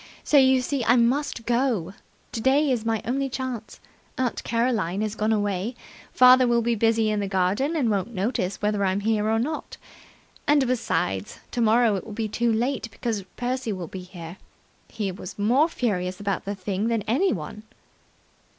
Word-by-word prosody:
So, - - 0
you 260 -1 +5
see, 260 0 -2
I 235 - +5
must 245 0 +1
go. 235 -8 0 0.4
Today's 265 0 +2
my 225 -1 -1
only 270 +3 -1
chance. 255 -4 -5 0.4
Aunt 255 -2 -1
Caroline 230 -6 0
has 215 -1 -1
gone 215 0 0
away. 205 +1 -1 0.4
Father 255 0 +7
will 235 -1 +2
be 235 +1 +1
busy 225 0 +2
in 210 - 0
the 200 - -2
garden, 195 - 0
and 280 -7 +1
won't 200 +2 -1
notice 195 -2 -2
whether 210 -1 +1
I'm 190 +1 +1
here 215 0 +1
or 225 - +2
not. 295 +7 -3 0.7
And, 290 -2 +4
besides, 105 - -1
tomorrow 230 -1 +3
it - - -6
will 215 - -9
be 220 +1 -2
too 235 +2 0
late, 235 +2 -1
because 225 -1 -3 0.2
Percy 250 -1 -2
will 185 -3 -4
be 190 - -7
here. 180 -1 -10 0.5
He 205 -4 -3
was 185 0 -9
more 250 +10 +3
furious 185 - -2
about 200 -2 -2
the 200 +1 -3
thing 195 +2 -2
than 230 -3 0
anyone." 215 - -1
225 Hz, 170 wpm, -25 LUFS, 200-250 Hz, 0.7 s, Father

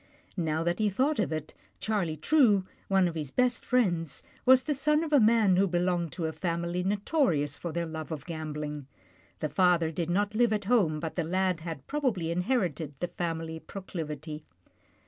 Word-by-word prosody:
Now 160 -3 0
that 175 +3 0
he 215 -1 +3
thought 265 +9 +1
of 200 - 0
it, 155 -1 -4 0.3
Charlie 190 -8 -1
True, 210 - +4 0.2
one 190 -2 +3
of 170 - -3
his 155 -4 -4
best 250 - +1
friends, 175 - 0 0.2
was 260 0 +7
the 295 - 0
son 300 +3 +2
of 310 -2 -4
a 285 - +7
man 220 -4 +4
who 195 +1 +4
belonged 175 -2 0
to 170 - -3
a 160 - -1
family 170 0 -2
notorious 195 - +1
for 170 - -5
their 170 +1 -2
love 160 0 -6
of 150 -3 -5
gambling. 150 -3 -5 0.5
The 155 - -1
father 175 -3 +3
did 165 +1 -3
not 205 +3 +1
live 230 0 +3
at 210 -2 -2
home, 190 -9 +2
but 160 0 -5
the 175 - 0
lad 185 +1 0
had 160 -4 -7
probably 235 - -1
inherited 175 - -1
the, 175 - -2
family 165 -1 -3
proclivity. 155 -5 -6
175 Hz, 185 wpm, -29 LUFS, 160-210 Hz, 0.5 s, was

